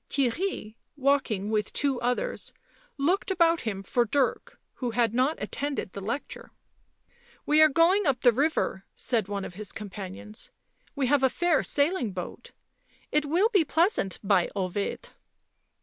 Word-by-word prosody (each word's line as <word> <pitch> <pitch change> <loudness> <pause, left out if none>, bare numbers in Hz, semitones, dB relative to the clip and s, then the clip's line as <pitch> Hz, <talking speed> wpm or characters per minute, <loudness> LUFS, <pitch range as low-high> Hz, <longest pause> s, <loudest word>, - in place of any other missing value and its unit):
Theirry, 270 - -1 0.2
walking 260 -7 +1
with 210 -1 0
two 275 -4 0
others, 250 - -2 0.4
looked 345 +10 +1
about 335 -3 +3
him 195 -3 -4
for 240 +5 +1
Dirk, 260 +3 -1 0.2
who 250 - -2
had 230 -1 +1
not 260 +6 +1
attended 280 -9 -3
the 200 - -6
lecture. 230 +8 -5 0.5
" - - -32
We 305 +1 +4
arc 310 -2 +6
going 360 +3 +4
up 260 -3 +1
the 245 - +6
river," 270 -6 0
said 225 -6 -1
one 200 -1 -3
of - - -8
his 205 +2 -6
com 210 -3 -8
panions. 200 +2 -7 0.2
" - - -37
We 280 -2 0
have 280 +2 +3
a 265 - +4
fair 345 +2 +2
sailing 285 - 0
boat 180 -2 -7 0.3
— - - -35
it 300 0 +2
will 360 +9 +3
be 400 -8 +4
pleasant, 320 - +1
by 195 -3 +3
Ovid 195 +1 -3
255 Hz, 165 wpm, -27 LUFS, 210-310 Hz, 0.5 s, arc